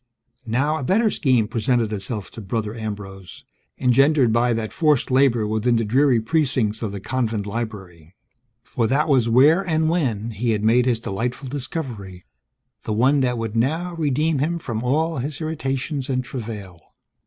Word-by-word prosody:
Now, 140 Hz, +7 st, +1 dB
a 140 Hz, -, -5 dB
better 215 Hz, -, +2 dB
scheme 125 Hz, -6 st, +2 dB
presented 115 Hz, 0 st, 0 dB
itself 100 Hz, 0 st, -5 dB
to 115 Hz, -, -9 dB
Brother 105 Hz, +1 st, -3 dB
Ambrose, 100 Hz, -4 st, -8 dB, 0.3 s
engendered 135 Hz, -1 st, +3 dB
by 120 Hz, +1 st, +2 dB
that 115 Hz, -2 st, -2 dB
forced 150 Hz, -6 st, +2 dB
labor 130 Hz, -4 st, +3 dB
within 110 Hz, +3 st, +1 dB
the 115 Hz, -1 st, +1 dB
dreary 130 Hz, +2 st, +3 dB
precincts 120 Hz, -5 st, 0 dB
of 110 Hz, -4 st, -3 dB
the 100 Hz, -, -5 dB
convent 110 Hz, -2 st, -2 dB
library. 95 Hz, -7 st, -6 dB, 0.5 s
For 115 Hz, -, -1 dB
that 140 Hz, +6 st, +1 dB
was 130 Hz, -6 st, +3 dB
where 145 Hz, +10 st, +5 dB
(and 160 Hz, -3 st, +1 dB
when) 115 Hz, -, -1 dB
he 115 Hz, +2 st, -1 dB
had 105 Hz, -1 st, -2 dB
made 120 Hz, +3 st, +3 dB
his 120 Hz, -3 st, +1 dB
delightful 120 Hz, +6 st, -4 dB
discovery, 125 Hz, -, -6 dB, 0.6 s
the 110 Hz, -, -3 dB
one 130 Hz, +6 st, +3 dB
that 125 Hz, -2 st, 0 dB
would 115 Hz, -1 st, -4 dB
now 160 Hz, +10 st, 0 dB
redeem 155 Hz, -1 st, 0 dB
him 165 Hz, +5 st, 0 dB
from 120 Hz, -9 st, -4 dB
all 155 Hz, +6 st, 0 dB
his 140 Hz, +4 st, -4 dB
irritations 140 Hz, -3 st, -3 dB
and 130 Hz, -1 st, 0 dB
travail. 105 Hz, -9 st, -7 dB
125 Hz, 165 wpm, -22 LUFS, 110-140 Hz, 0.6 s, where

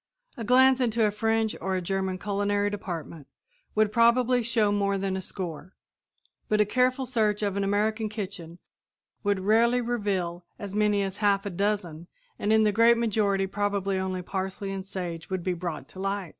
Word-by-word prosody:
A 235 Hz, -, -6 dB
glance 260 Hz, +3 st, +5 dB
into 230 Hz, -2 st, +2 dB
a 210 Hz, -, +2 dB
French 225 Hz, +1 st, 0 dB
or 190 Hz, 0 st, -1 dB
a -, -, 0 dB
German 190 Hz, +1 st, -2 dB
culinary 205 Hz, +1 st, 0 dB
department 170 Hz, -7 st, -6 dB, 0.5 s
would 215 Hz, -1 st, +3 dB
probably 240 Hz, +2 st, +4 dB
show 225 Hz, -2 st, +1 dB
more 200 Hz, -1 st, +1 dB
than 195 Hz, -1 st, -2 dB
a 190 Hz, -, -3 dB
score; 180 Hz, -2 st, -7 dB, 0.7 s
but 215 Hz, -, +2 dB
a 210 Hz, -, +5 dB
careful 255 Hz, +4 st, +1 dB
search 215 Hz, -4 st, 0 dB
in 200 Hz, -2 st, -1 dB
an 200 Hz, -, 0 dB
American 215 Hz, +2 st, 0 dB
kitchen 185 Hz, -6 st, -6 dB, 0.7 s
would 205 Hz, -2 st, +1 dB
rarely 230 Hz, +5 st, +3 dB
reveal 200 Hz, -8 st, -2 dB
as 200 Hz, -1 st, -7 dB
many 210 Hz, -1 st, +2 dB
as 195 Hz, 0 st, -4 dB
half 205 Hz, -1 st, +2 dB
a 200 Hz, -, -3 dB
dozen, 180 Hz, -4 st, -2 dB, 0.3 s
and 210 Hz, -, 0 dB
in 220 Hz, 0 st, +5 dB
the 210 Hz, -, +3 dB
great 230 Hz, +3 st, +5 dB
majority 205 Hz, -4 st, +1 dB
probably 200 Hz, -1 st, -1 dB
only 185 Hz, -1 st, -3 dB
parsley 190 Hz, +1 st, -4 dB
and 195 Hz, -1 st, -5 dB
sage 175 Hz, -4 st, -5 dB
would 185 Hz, -2 st, -2 dB
be 185 Hz, -, 0 dB
brought 175 Hz, -2 st, -5 dB
to 185 Hz, -, -12 dB
light. 195 Hz, -2 st, -2 dB
205 Hz, 180 wpm, -27 LUFS, 190-220 Hz, 0.7 s, glance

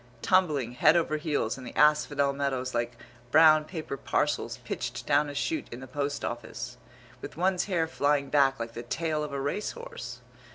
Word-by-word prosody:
Tumbling 155 Hz, -10 st, +2 dB
head 155 Hz, +7 st, +4 dB
over 155 Hz, -2 st, +1 dB
heels 150 Hz, -6 st, -1 dB
in -, -, -9 dB
the 125 Hz, -, -9 dB
asphodel 150 Hz, -2 st, +3 dB
meadows 135 Hz, -2 st, -2 dB
like 120 Hz, 0 st, -2 dB, 0.3 s
brown 155 Hz, +2 st, +6 dB
paper 155 Hz, -4 st, -5 dB
parcels -, -, -1 dB
pitched -, -, -4 dB
down 145 Hz, 0 st, +3 dB
a 145 Hz, -, -7 dB
shoot 315 Hz, -, -1 dB
in 120 Hz, -, -7 dB
the 130 Hz, -, -8 dB
post 140 Hz, +2 st, -3 dB
office! 120 Hz, -1 st, -6 dB, 0.4 s
With -, -, -8 dB
one's 185 Hz, +1 st, +1 dB
hair 175 Hz, -5 st, +1 dB
flying 145 Hz, -3 st, 0 dB
back 135 Hz, -3 st, +3 dB
like 115 Hz, 0 st, -5 dB
the 115 Hz, -, -5 dB
tail 155 Hz, +5 st, -2 dB
of 150 Hz, -, -5 dB
a 140 Hz, -, -3 dB
race 145 Hz, +10 st, -2 dB
horse. 480 Hz, 0 st, -8 dB
145 Hz, 180 wpm, -28 LUFS, 135-160 Hz, 0.4 s, brown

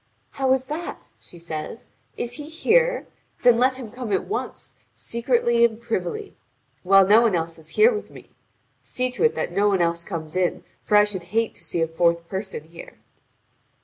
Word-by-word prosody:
"How 265 Hz, -1 st, 0 dB
is 265 Hz, 0 st, 0 dB
that?" 315 Hz, +5 st, -6 dB
she 175 Hz, -, -13 dB
says, 165 Hz, +4 st, -7 dB, 0.3 s
"is 240 Hz, 0 st, -3 dB
he 295 Hz, +1 st, -8 dB
here? -, -, +2 dB, 0.4 s
Then 245 Hz, -2 st, +6 dB
let 260 Hz, +1 st, +3 dB
him 245 Hz, -5 st, -8 dB
come 245 Hz, -2 st, -6 dB
at 190 Hz, -, 0 dB
once, 420 Hz, -, -5 dB, 0.2 s
secretly 235 Hz, 0 st, +1 dB
and 225 Hz, -1 st, +2 dB
privily, 235 Hz, -, -4 dB, 0.5 s
while 195 Hz, +1 st, +6 dB
no 210 Hz, +4 st, +6 dB
one 225 Hz, -5 st, +3 dB
is 165 Hz, -1 st, -4 dB
here 455 Hz, +3 st, +5 dB
with 425 Hz, -, -5 dB
me. -, -, -14 dB, 0.5 s
See 255 Hz, 0 st, -2 dB
to 255 Hz, -, -2 dB
it 465 Hz, -, +3 dB
that -, -, -2 dB
no 200 Hz, +3 st, +2 dB
one 195 Hz, -2 st, +2 dB
else 170 Hz, 0 st, 0 dB
come 165 Hz, -4 st, -5 dB
in, 185 Hz, -1 st, 0 dB, 0.2 s
for 210 Hz, -, +3 dB
I 210 Hz, -, +7 dB
should 195 Hz, -4 st, -4 dB
hate 230 Hz, -1 st, +1 dB
to -, -, -12 dB
see 170 Hz, -, -1 dB
a -, -, 0 dB
fourth 170 Hz, +1 st, +1 dB
person 190 Hz, -5 st, -4 dB
here." 165 Hz, -, -12 dB
220 Hz, 185 wpm, -23 LUFS, 175-255 Hz, 0.5 s, I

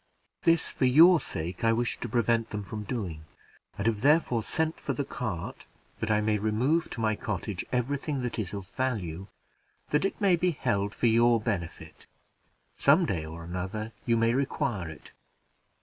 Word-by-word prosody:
This, 165 Hz, -1 st, +3 dB
for 130 Hz, -, 0 dB
your 160 Hz, +7 st, +7 dB
sake 85 Hz, -, -5 dB
I 115 Hz, -, +4 dB
wish 120 Hz, +1 st, -1 dB
to 120 Hz, -, -4 dB
prevent 115 Hz, -1 st, +1 dB
them 105 Hz, -1 st, -4 dB
from 105 Hz, +1 st, -6 dB
doing, 95 Hz, -9 st, -4 dB, 0.5 s
and 100 Hz, -, -3 dB
have 110 Hz, -3 st, +1 dB
therefore 140 Hz, -4 st, +3 dB
sent 160 Hz, +7 st, -2 dB
for -, -, -2 dB
the -, -, -2 dB
cart, -, -, -5 dB, 0.3 s
that 110 Hz, -, -2 dB
I 105 Hz, 0 st, +3 dB
may 105 Hz, 0 st, +1 dB
remove 125 Hz, +11 st, +1 dB
to 115 Hz, -, -5 dB
my 110 Hz, -1 st, +2 dB
cottage 100 Hz, -2 st, -4 dB
every 125 Hz, +3 st, 0 dB
thing 140 Hz, -3 st, -3 dB
that 120 Hz, -1 st, -3 dB
is 100 Hz, -4 st, -3 dB
of 100 Hz, -2 st, -6 dB
value, 95 Hz, -9 st, -3 dB, 0.6 s
that 150 Hz, +3 st, +2 dB
it 195 Hz, -, -1 dB
may 195 Hz, -3 st, +4 dB
be 175 Hz, -3 st, 0 dB
held 100 Hz, -5 st, 0 dB
for -, -, -1 dB
your 115 Hz, +1 st, +5 dB
benefit; 100 Hz, -7 st, -5 dB, 0.7 s
some 155 Hz, +6 st, +5 dB
day 90 Hz, -, -2 dB
or 80 Hz, +1 st, -8 dB
another 95 Hz, +6 st, -4 dB, 0.2 s
you 115 Hz, -1 st, +3 dB
may 115 Hz, +1 st, +3 dB
require 130 Hz, -, -1 dB
it. 80 Hz, -, -12 dB
115 Hz, 180 wpm, -28 LUFS, 100-130 Hz, 0.7 s, your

